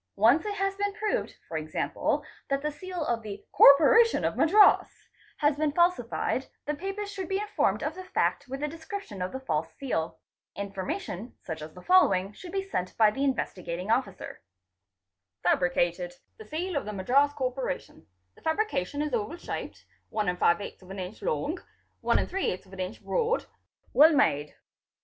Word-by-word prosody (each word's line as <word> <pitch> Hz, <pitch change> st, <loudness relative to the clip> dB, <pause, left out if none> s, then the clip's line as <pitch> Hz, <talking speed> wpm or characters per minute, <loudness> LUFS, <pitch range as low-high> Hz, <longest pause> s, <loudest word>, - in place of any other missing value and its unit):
Once 240 Hz, -, +4 dB
it 410 Hz, -, -2 dB
has 390 Hz, 0 st, 0 dB
been 405 Hz, 0 st, -1 dB
proved, 430 Hz, 0 st, -1 dB
e. 155 Hz, -1 st, -7 dB
q., -, -, 0 dB, 0.3 s
that 275 Hz, 0 st, 0 dB
the 300 Hz, -, 0 dB
seal 355 Hz, +2 st, -5 dB
of 235 Hz, -3 st, 0 dB
the 205 Hz, -2 st, -8 dB
'' -, -, -53 dB
Corporation 390 Hz, +12 st, +7 dB
of -, -, 0 dB
Madras'' 400 Hz, +6 st, +4 dB, 0.3 s
has 295 Hz, -1 st, +2 dB
been 305 Hz, -1 st, +1 dB
falsified, 285 Hz, -6 st, +1 dB, 0.2 s
the 295 Hz, -, -1 dB
papers 390 Hz, +5 st, -4 dB
should 380 Hz, -3 st, -5 dB
be 385 Hz, -, +1 dB
informed 295 Hz, -, 0 dB
of 300 Hz, +2 st, -1 dB
the 370 Hz, +2 st, -8 dB
fact 370 Hz, -, 0 dB
with 270 Hz, +3 st, -5 dB
a -, -, +1 dB
description 320 Hz, -, -7 dB
of 180 Hz, -, -2 dB
the 265 Hz, -, -5 dB
false 160 Hz, -12 st, -2 dB
seal. 170 Hz, -12 st, -2 dB, 0.4 s
Information 200 Hz, -, -5 dB
such 160 Hz, -2 st, -5 dB
as 155 Hz, +1 st, -9 dB
the 180 Hz, -, -11 dB
following 200 Hz, -, +4 dB
should 355 Hz, -, -10 dB
be 390 Hz, 0 st, -2 dB
sent 185 Hz, -, -3 dB
by 215 Hz, -2 st, +6 dB
the 270 Hz, +6 st, -2 dB
Investigating 185 Hz, -8 st, -2 dB
Officer 225 Hz, -6 st, -2 dB, 1.0 s
:—''F'abricated—the 175 Hz, -, 0 dB
seal 345 Hz, +3 st, -3 dB
of 285 Hz, -, -1 dB
the 210 Hz, -, -5 dB
Madras 260 Hz, +9 st, +3 dB
Corporation, 255 Hz, -6 st, -4 dB, 0.3 s
the -, -, -21 dB
fabrication 315 Hz, -, -1 dB
is 300 Hz, -3 st, -3 dB
oval 235 Hz, +8 st, -1 dB
shaped, -, -, -6 dB, 0.2 s
12 210 Hz, -3 st, -1 dB, 0.7 s
inch 185 Hz, +3 st, -6 dB
long, 295 Hz, -, -1 dB, 0.4 s
12 195 Hz, -, -1 dB
inch 185 Hz, 0 st, -5 dB
broad, 475 Hz, 0 st, 0 dB, 0.5 s
well 315 Hz, +3 st, +7 dB
made." 150 Hz, -, +2 dB
275 Hz, 155 wpm, -28 LUFS, -, 1.0 s, Corporation